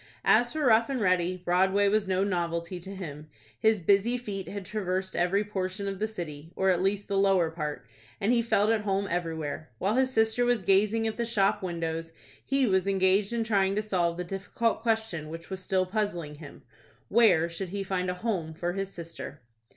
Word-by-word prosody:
As 240 0 +4
for 310 -2 -1
Rough 230 0 +5
and 270 -2 -1
Ready, 185 -3 +2
Broadway 190 +3 +3
was 205 0 +2
no 190 0 +1
novelty 170 -2 -2
to 195 +3 -8
him. 155 -5 -7 0.3
His 220 -1 +3
busy 200 +7 +3
feet 200 -6 -5
had 200 -1 -6
traversed 190 -2 -2
every 185 +4 +2
portion 200 -1 -3
of 195 -1 -4
the 215 - 0
city, 165 -7 -7
or 190 0 +3
at 180 -1 +1
least 200 +1 0
the 195 -1 +1
lower 190 -4 +3
part, 150 -6 -4 0.3
and 210 +5 +2
he 235 - +3
felt 220 -2 +2
at 225 -2 +2
home 200 -1 0
everywhere. 160 -3 -3
While 195 - 0
his 260 0 +2
sister 225 0 +2
was 240 -4 +1
gazing 210 +4 +3
at 220 - -2
the 235 - 0
shop 210 -2 +2
windows, 165 -2 -3 0.3
he 275 0 +2
was 190 -3 +2
engaged 195 +1 +2
in 235 -1 0
trying 200 -3 +2
to 210 - 0
solve 175 -5 0
the 180 - -2
difficult 195 +5 -1
question 220 -9 -1
which 165 +3 -9
was 190 - -3
still 185 0 +1
puzzling 185 -6 -2
him,—"Where 170 +5 0
should 170 +2 -5
he 200 +2 -3
find 185 -1 -1
a 180 - -2
home 180 -7 -3
for 175 +2 -2
his 195 0 -3
sister?" 165 -4 -8
195 Hz, 195 wpm, -28 LUFS, 175-215 Hz, 0.3 s, Rough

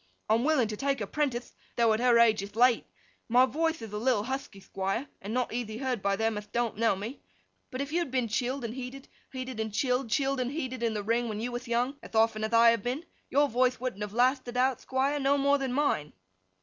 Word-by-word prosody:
I'm 225 +2 +3
willing 280 -6 +3
to 215 - -3
take 275 +4 0
her 205 - -2
prentith, 260 0 -2 0.2
though 230 -2 +4
at 215 - 0
her 245 -1 +4
age 225 -3 +5
ith 200 +1 -8
late. 245 +1 +4 0.4
My 250 +2 +6
voithe 320 +2 -1
ith 215 -2 -8
a - - -2
little 230 -2 +1
huthky, 260 -4 -5
Thquire, 195 +7 -3
and 200 - -6
not 250 +1 -1
eathy 225 -2 -4
heard 255 -5 -2
by 200 0 +1
them 225 0 0
ath 210 - -14
don't 235 -1 -1
know 225 -1 +2
me; 215 +8 -7 0.5
but 255 0 -4
if 280 +1 -4
you'd 340 -2 0
been 255 -2 0
chilled 245 +4 -1
and 225 - -4
heated, 260 +1 -7 0.2
heated 255 -3 -6
and 220 -1 -2
chilled, 250 +2 0
chilled 270 +3 +1
and 250 -1 0
heated 260 -5 -4
in 230 -2 0
the 205 - -2
ring 230 +2 0
when 210 -1 -4
you 240 +3 -3
wath 245 +1 -5
young, 245 +4 0
ath - - -11
often 220 -1 +3
ath 220 - -1
I 230 0 +7
have 230 -2 0
been, 255 - -3 0.2
your 290 +1 +3
voithe 250 0 +2
wouldn't 245 -5 -4
have 210 -1 -3
lathted 250 0 +1
out, 255 0 +2
Thquire, 275 +2 0
no 275 +1 +3
more 280 0 +3
than 265 -2 -2
mine. 250 - 0
245 Hz, 240 wpm, -29 LUFS, 220-265 Hz, 0.5 s, I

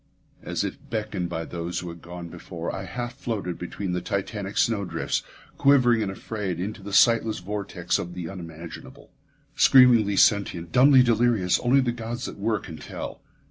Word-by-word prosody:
As - - -2
if - - -4
beckoned 105 -5 -3
by 80 -1 -4
those 85 0 -5
who 90 - -4
had 85 0 -10
gone 85 0 -8
before, 85 0 -6
I 95 0 -5
half 120 +4 -5
floated 110 -9 -4
between 90 +2 -4
the 90 0 -1
titanic 100 0 -4
snowdrifts, 100 -5 0 0.4
quivering 125 -5 +5
and 100 -3 -1
afraid, 95 -3 -4
into 105 +3 -4
the 100 +1 -8
sightless 115 +1 +4
vortex 90 -2 -2
of 90 0 -6
the 90 -2 -5
unimaginable. 85 -2 -10 0.4
Screamingly 120 -6 +6
sentient, 95 -5 +2
dumbly 130 +1 +7
delirious, 115 -6 +2
only 130 +3 +3
the 125 -2 0
gods 120 +1 -5
that - - -7
were 110 +2 +1
can 85 -5 -9
tell. - - -7
100 Hz, 165 wpm, -25 LUFS, 90-115 Hz, 0.4 s, dumbly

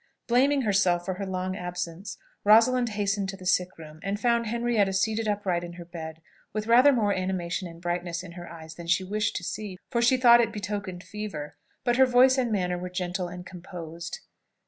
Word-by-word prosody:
Blaming 270 +3 +3
herself 190 -5 +2
for 185 - -1
her 195 +1 -5
long 185 0 -2
absence, 180 +1 -5 0.3
Rosalind 235 +4 +5
hastened 200 -2 -1
to 195 - -6
the 185 - -12
sick 180 0 +1
room, 155 -1 -11
and 200 +2 -2
found 235 0 +2
Henrietta 230 -3 +1
seated 220 +3 0
upright 195 -4 0
in 175 0 -7
her 170 0 -9
bed, 160 -2 -8 0.3
with 215 0 -2
rather 245 +5 +6
more 215 -6 +2
animation 185 -1 -2
and 165 -1 -11
brightness 175 0 -3
in 180 - -9
her 175 0 -9
eyes 160 -1 -10
than 170 +1 -10
she 170 +2 +2
wished 210 +3 -1
to 175 - -3
see, 200 +1 -5
for 235 - +1
she 245 +2 +4
thought 240 -1 +7
it 230 -1 0
betokened 205 -3 -5
fever; 160 -9 -6 0.3
but 240 0 +1
her 265 0 +6
voice 255 +1 +5
and 245 -3 0
manner 180 -3 0
were 180 +1 -5
gentle 180 0 -3
and 180 +1 -8
composed. 170 -2 -8
190 Hz, 200 wpm, -27 LUFS, 175-220 Hz, 0.3 s, thought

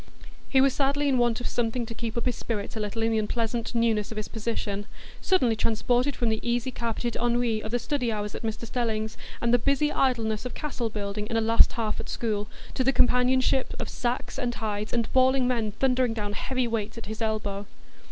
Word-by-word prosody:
He 265 - +5
was 270 -1 +4
sadly 280 +1 +1
in 265 -3 +3
want 240 -2 +2
of - - -2
something 240 0 -1
to 230 - -7
keep 230 0 -4
up 235 - -1
his 250 - +1
spirits 210 -2 -4
a - - -3
little 215 +2 -2
in 225 - +2
the 220 - +2
unpleasant 230 +2 -2
newness 225 -3 +2
of 220 - -7
his 215 - -3
position,—suddenly 225 - -1
transported 245 +5 +1
from 235 - 0
the 220 0 +1
easy 240 +1 0
carpeted 235 -1 -2
ennui 240 -2 +1
of 230 +3 -1
study 250 -2 -1
hours 210 -1 -3
at - - -6
Mr 225 0 -3
Stelling's, 220 -2 -1 0.3
and 235 0 +2
the 245 - +6
busy 280 +4 +2
idleness 225 -5 +1
of 250 - -5
castle 260 -6 -3
building 210 0 -4
in 225 - -1
a - - +4
"last 225 +1 +5
half" 220 -2 -2
at - - -5
school, 210 -3 -1 0.3
to 260 - +1
the 270 - +4
companionship 255 +1 +3
of - - -3
sacks 245 0 -2
and 240 -2 -1
hides, 210 -1 -3
and 235 -2 -1
bawling 260 0 +4
men 230 -4 0
thundering 255 -1 +2
down 205 -2 -3
heavy 255 +3 -1
weights 220 -1 -2
at 230 - -7
his 220 +2 -6
elbow. 210 -2 -2
230 Hz, 210 wpm, -27 LUFS, 220-250 Hz, 0.3 s, the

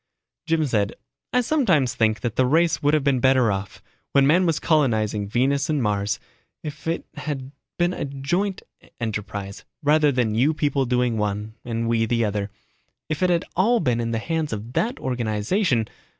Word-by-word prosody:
Jim 160 -1 +2
said, 105 -6 0 0.4
"I 250 - +3
sometimes 190 - +2
think 110 -1 +1
that 120 -3 -2
the 130 - +3
race 165 +5 +2
would 145 +1 +3
have 150 - +1
been 135 -2 +2
better 130 -3 +4
off, 95 0 -5 0.3
when 140 -1 +5
man 175 +6 +4
was 165 - +1
colonizing 110 -9 +1
Venus 135 +6 +1
and 150 -2 +1
Mars, 105 -3 0 0.4
if 150 +1 -7
it 165 - -1
had 135 -3 -4 0.3
been 175 +1 +2
a - - -4
joint 145 +9 -2 0.4
enterprise 105 -3 -4 0.2
rather 150 0 +4
than 125 -5 0
you 135 +8 +2
people 145 -2 +1
doing 125 -2 +1
one, 105 +1 -2
and 115 -1 -2
we 115 -1 +1
the 115 0 +1
other. 105 -1 -2 0.6
If 155 +1 -2
it 185 - +3
had 170 -1 +1
all 230 +7 +3
been 125 -6 +1
in 115 0 -1
the 115 - -1
hands 160 +5 -2
of 110 +3 -5
that 235 - 0
organization 120 - 0
130 Hz, 180 wpm, -23 LUFS, 110-155 Hz, 0.6 s, when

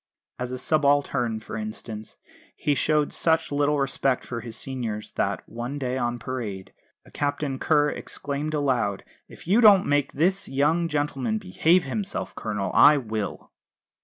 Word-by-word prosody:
As 125 0 -3
a 130 - -3
subaltern, 140 -6 +1
for 110 - -8
instance, 110 0 -6 0.4
he 145 - 0
showed 150 +1 +1
such 160 -1 +1
little 145 +1 +2
respect 135 -1 0
for 120 -1 -5
his 115 -1 -7
seniors 115 -5 -5
that, - - -2
one 120 +5 -5
day 130 -2 -2
on 120 -2 -1
parade, 115 -6 -5 0.3
a - - -17
Captain 145 -2 -2
Kerr 150 -2 +3
exclaimed 145 +2 -3
aloud: 125 -9 0 0.2
"If - - -14
you 210 +7 +4
don't 205 -4 +7
make 145 -1 +1
this 185 +6 0
young 155 +5 +2
gentleman 150 +5 -1
behave 185 -3 +2
himself, 200 +1 -4
Colonel, 105 -4 -3
I 150 0 +7
will." 110 -6 -4
140 Hz, 150 wpm, -25 LUFS, 120-150 Hz, 0.4 s, don't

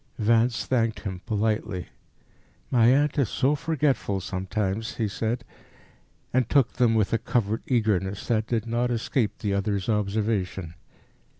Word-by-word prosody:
Vance 115 +1 +2
thanked 115 -3 0
him 95 -3 -5
politely. 105 -3 -1 0.8
"My 115 -3 +5
aunt 145 +4 +3
is 130 -7 +2
so 140 +2 +2
forgetful 145 -9 0
sometimes," 95 +3 -3
he 110 - 0
said, 115 +4 -2 0.9
and 125 -2 +2
took 135 -5 +3
them 120 -3 +3
with 110 -1 +1
a 115 - +2
covert 110 -2 0
eagerness 105 -5 0
that 110 -2 +1
did 115 -2 -1
not 120 +1 0
escape 115 -1 -1
the 105 -2 -2
other's 100 -1 -1
observation. 100 -4 -1
110 Hz, 135 wpm, -26 LUFS, 100-120 Hz, 0.9 s, My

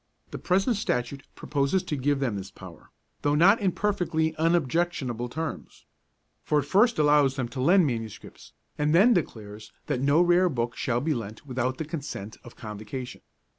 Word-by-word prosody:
The - - -6
present 195 +5 +1
Statute 140 - -3
proposes 145 +6 0
to 150 - -3
give 140 +1 0
them 125 -6 -1
this 95 -1 -6
power, 90 -5 -13 0.3
though 145 0 +1
not 195 +8 +5
in 195 -2 +2
perfectly 170 -6 -1
unobjectionable 160 -6 0
terms. 160 +4 -6 0.6
For 150 - +1
it 145 - +2
first 210 - +3
allows 145 -3 +4
them 130 -3 -2
to 130 +1 -5
lend 180 +6 +5
manuscripts, 115 -5 -6 0.3
and 150 +2 +2
then 220 +8 +6
declares 110 - -4
that 125 - -2
no 140 +3 +3
rare 175 +1 +4
book 120 -5 -2
shall 120 -1 -1
be 155 +3 0
lent 110 -1 -7
without 130 -1 -2
the 160 - -4
consent 145 - -6
of 120 - -13
Convocation. 110 +4 -7
145 Hz, 170 wpm, -26 LUFS, 120-170 Hz, 0.6 s, then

